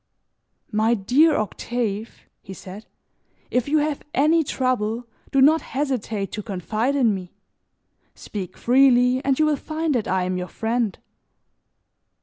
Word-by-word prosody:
"My 220 +2 +2
dear 275 +10 +3
Octave," 220 0 -3 0.2
he 190 - -10
said, 195 +4 -10 0.6
"if 250 0 +1
you 310 - +3
have 300 -1 0
any 315 +4 +4
trouble, 245 -4 -1 0.2
do 275 - +2
not 310 +4 +5
hesitate 245 -8 -3
to 210 - -4
confide 215 +7 -2
in 240 -6 +3
me. 185 -2 -7 0.8
Speak 195 -4 -7
freely 250 0 +4
and 270 -1 +1
you 310 - +3
will 305 -1 +2
find 315 +2 -2
that 235 -5 -1
I 185 0 +1
am 185 0 -2
your 180 - -4
friend!" 225 -1 -2
240 Hz, 135 wpm, -23 LUFS, 210-275 Hz, 0.8 s, not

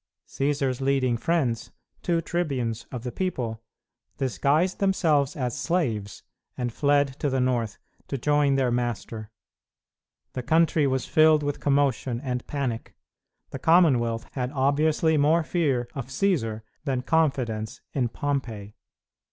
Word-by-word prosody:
Cćsar's 135 -2 -1
leading 135 -3 +2
friends, 125 -4 0 0.3
two 170 -2 +1
tribunes 135 -10 -2
of 125 -3 -5
the 125 - -4
people, 120 -12 -3 0.6
disguised 140 - +1
themselves 155 -8 +2
as 125 -4 -2
slaves 115 - -2 0.3
and 120 -2 -2
fled 140 -1 +2
to 145 - 0
the 130 0 0
north 120 -4 0 0.3
to 140 - -3
join 145 +1 +2
their 130 -2 +2
master. 120 -2 -3 1.0
The 130 - -3
country 160 +2 +3
was 130 -2 0
filled 155 -1 +4
with 145 0 -2
commotion 135 -4 +1
and 125 -2 -4
panic. 130 -6 -3 0.6
The - - -5
Commonwealth 130 -10 +3
had 125 -1 -3
obviously 155 +3 +2
more 155 +3 +3
fear 140 -8 0
of 135 -4 -5
Cćsar 130 - 0 0.2
than 130 -4 -1
confidence 130 -9 0
in 125 -4 0
Pompey. 115 -7 -3
135 Hz, 125 wpm, -26 LUFS, 120-150 Hz, 1.0 s, filled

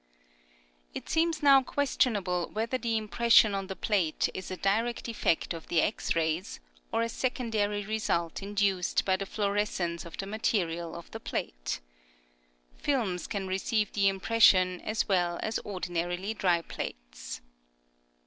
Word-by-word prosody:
It - - -6
seems 325 -1 +1
now 275 -2 +8
questionable 225 -11 0
whether 230 +4 -1
the 230 -2 0
impression 220 0 +4
on 195 -1 -2
the 190 - -5
plate 185 -8 +1
is 185 - -6
a 185 - -4
direct 225 +6 0
effect 210 -7 0
of 165 -1 -8
the 170 - +2
X 210 - 0
rays, 165 +2 -1 0.3
or 230 - +1
a - - 0
secondary 225 -5 -1
result 195 -6 -1
induced 195 -3 +1
by 190 - +3
the 195 +1 -4
fluorescence 200 -5 -1
of 170 - -10
the 195 - -3
material 175 -6 -1
of 170 - -10
the - - -6
plate. - - -4 1.0
Films 220 -11 -1
can 200 -3 -3
receive 205 +3 0
the 200 -1 +3
impression 190 -2 +4
as 215 0 -1
well 175 -3 +1
as 220 - -1
ordinarly 180 +1 -3
dry 175 -5 +1
plates. - - -7
195 Hz, 140 wpm, -29 LUFS, 175-225 Hz, 1.0 s, now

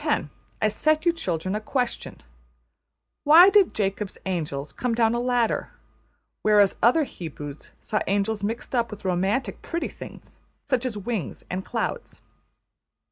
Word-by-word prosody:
\ - - -11 0.6
I 215 - +3
set 310 - +1
you 345 - +4
children 185 - -2
a 210 - -2
question: 245 +2 -3 1.0
Why 340 +6 +8
did 400 -3 +4
Jacob's 200 -1 -2
angels 150 -6 -3
come 245 -2 -1
down 225 -1 +3
a 240 - 0
ladder, 245 -2 0 0.7
whereas 205 -2 +4
other 250 +8 +5
Hebrews 150 - -8
saw 215 - -1
angels 205 +2 0
mixed 225 +5 -3
up 235 -2 +1
with 210 -2 -10
romantic 190 +8 0
pretty 335 0 -3
things - - -12 0.3
such 255 -2 0
as 225 -4 -3
wings 200 - -4
and 185 +1 -3
clouds? 470 - -4
215 Hz, 140 wpm, -25 LUFS, 190-250 Hz, 1.0 s, Why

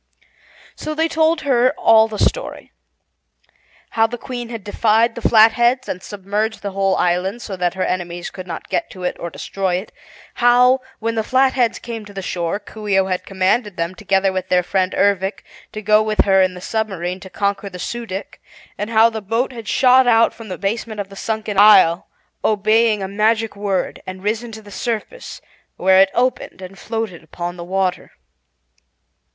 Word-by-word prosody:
So 310 0 -5
they 320 +1 +1
told 320 0 +1
her 255 -3 +2
all 220 0 +5
the 215 -1 -7
story: - - -2 1.2
How 225 0 +3
the 240 +2 -6
Queen 240 -1 -6
had 230 -4 -7
defied 225 +3 +2
the 235 - -8
Flatheads 235 +4 +4
and 185 - -4
submerged 205 +3 -3
the 200 - -3
whole 195 0 +1
island 185 +6 0
so 195 - -5
that 180 0 -1
her 185 - -1
enemies 175 -1 -3
could 185 -1 -9
not 165 - -7
get 340 - -2
to 185 -2 -10
it 180 - -1
or 170 - -5
destroy 190 +2 -3
it; 185 +4 -5 0.5
how, 250 +2 +5 0.2
when 230 +1 -2
the 220 -1 -1
Flatheads 255 -1 +2
came 230 -2 -7
to 205 -1 -14
the 195 - -5
shore, 170 0 -2
Coo 215 0 -10
ee 195 -2 +2
oh 190 - +3
had 185 -1 -3
commanded 195 +2 0
them, 170 +2 -2
together 195 -1 0
with 185 0 -4
their 180 0 +3
friend 185 +1 -1
Ervic, 200 0 +1 0.3
to 215 -1 -7
go 215 +1 +4
with 215 0 +1
her 190 -1 +4
in 185 -1 +1
the 180 - -9
submarine 190 -4 -3
to 190 - -11
conquer 200 +1 -2
the 180 - -9
Su 235 +5 -5
dic, 190 0 -7 0.4
and 210 - -3
how 225 0 +5
the 220 -1 -5
boat 225 +6 -1
had 230 -4 -9
shot 255 +4 +4
out 230 -1 +4
from 225 -1 -11
the 185 - -5
basement 215 +3 -3
of 200 -1 -4
the 195 - -12
sunken 215 -1 -2
isle, 195 -5 +6 0.4
obeying 215 0 +2
a - - -3
magic 220 +2 0
word, 200 -2 -2
and 185 0 -8
risen 225 +3 -2
to 220 0 -10
the 205 - -14
surface, 240 - -5 0.4
where 190 +1 +5
it 195 - +4
opened 250 -4 -1
and 190 +1 -10
floated 220 -6 -4
upon 175 +2 -6
the 170 - -8
water. 185 +1 -2
210 Hz, 190 wpm, -19 LUFS, 190-230 Hz, 1.2 s, isle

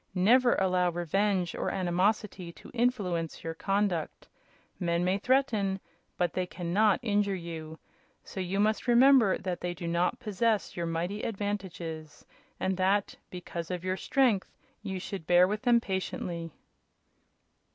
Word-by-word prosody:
Never 240 +7 +5
allow 185 -1 +2
revenge 180 +2 0
or - - -2
animosity 185 0 0
to - - -14
influence 205 -10 -1
your 165 - -3
conduct. 195 -2 -1 0.5
Men 170 0 0
may 190 +2 +1
threaten, 220 -6 +1 0.4
but 175 -2 0
they 185 -1 -1
can 175 -1 -5
not 210 0 +4
injure 205 -3 +1
you, 160 -3 -7 0.5
so - - -8
you 185 +2 -2
must 215 +4 +1
remember 245 -3 +6
that 180 -2 -4
they 175 0 -3
do 170 0 -6
not 170 +2 0
possess 215 -3 0
your 170 -1 -2
mighty 175 +6 -2
advantages, 185 -7 -5 0.3
and 190 -1 -1
that, 195 +2 +1
because 170 -2 -6
of 180 -1 -4
your 185 0 0
strength, 235 -2 +1 0.2
you 190 -3 -4
should 185 -3 -6
bear 180 +1 +6
with 210 +2 -2
them 240 -2 +4
patiently." 180 -4 -4
190 Hz, 140 wpm, -29 LUFS, 175-210 Hz, 0.5 s, remember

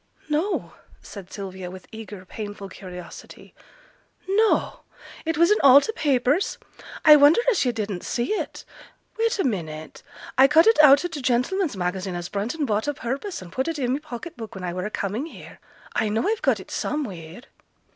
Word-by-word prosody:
'No!' 320 +7 -1 0.3
said 195 -4 -10
Sylvia, 190 -2 -7
with 185 0 -11
eager 210 -4 -9
painful 205 0 -7
curiosity. 180 -2 -11 0.7
'No! 425 +3 +2 0.5
It 325 -1 -1
was 340 +4 +5
in 420 - +4
all 275 0 +9
t' 365 - -3
papers! 285 - +1 0.5
I 305 -1 +10
wonder 290 +6 +6
as 425 - +1
yo' 250 - +1
didn't 205 -5 -4
see 240 - -2
it. - - -4 0.5
Wait 460 +1 +1
a 390 - +1
minute! 160 - -4 0.4
I 265 - +9
cut 315 +4 +5
it 450 -8 +6
out 285 +2 +7
o' - - +1
t' 320 -5 -7
Gentleman's 260 - 0
Magazine, 185 +1 -2
as 175 0 -5
Brunton 235 +10 -2
bought 215 +1 -1
o' 290 - -1
purpose, 270 - -4
and 175 - -12
put 260 - -2
it 330 -1 -2
i' 270 - -1
my 255 +3 0
pocket 305 +3 -8
book 225 -4 -9
when 190 - -7
I 175 -1 -3
were 180 +3 -3
a - - -5
coming 215 +8 -3
here: - - -13 0.3
I 215 - 0
know 220 - 0
I've 440 +1 0
got - - +2
it - - -12
somewheere.' 190 - -4
245 Hz, 185 wpm, -24 LUFS, 195-310 Hz, 0.7 s, I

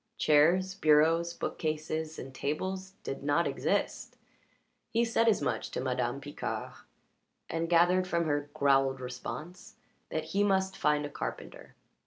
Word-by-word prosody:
Chairs, 170 +5 +4
bureaus, 165 +1 +4
bookcases, 155 -1 -3
and 130 +1 -8
tables 185 +7 -3
did 135 - -5
not 145 +4 +2
exist. - - -1 0.7
He 230 +1 +2
said 230 0 +2
as 220 - +3
much - - -1
to - - -4
Madame 125 0 -1
Picard, 145 +1 -5 0.8
and 165 0 -1
gathered 175 +2 +4
from 170 -1 0
her 145 -1 -1
growled 135 -2 +3
response 130 +8 -7 0.3
that 160 - -2
he 200 +1 +3
must 190 -1 +1
find 150 0 +1
a - - -5
carpenter. - - -7
155 Hz, 135 wpm, -30 LUFS, 145-185 Hz, 0.8 s, Chairs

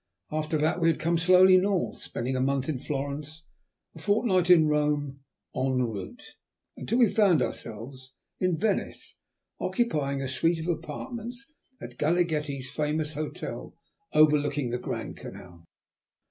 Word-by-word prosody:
After 155 0 -1
that 160 +4 +1
we 165 - +4
had 165 - +2
come 170 +1 +1
slowly 185 +2 +7
north, 195 -1 -1
spending 125 +3 -3
a 130 - 0
month 135 0 0
in 150 -5 -2
Florence, 145 +3 -5 0.5
and - - -12
a - - -13
fortnight 200 -4 +2
in 170 -3 +7
Rome 150 -2 0 0.4
en 130 0 0
route, 115 -7 -3 0.5
until 230 - -2
we 245 -2 +6
found 195 -7 +4
ourselves 130 +3 -5 0.2
in 185 -3 +1
Venice, 210 +1 -2 0.4
occupying 150 - 0
a 135 - -2
suite 165 +6 +1
of 160 - -5
apartments 235 - -5 0.3
at - - -10
Galaghetti's 150 -5 0
famous 150 0 -1
hotel 155 +1 -6 0.4
overlooking 145 -4 +3
the 125 - -2
Grand - - -5
Canal. 85 -2 -11
155 Hz, 140 wpm, -27 LUFS, 135-175 Hz, 0.5 s, slowly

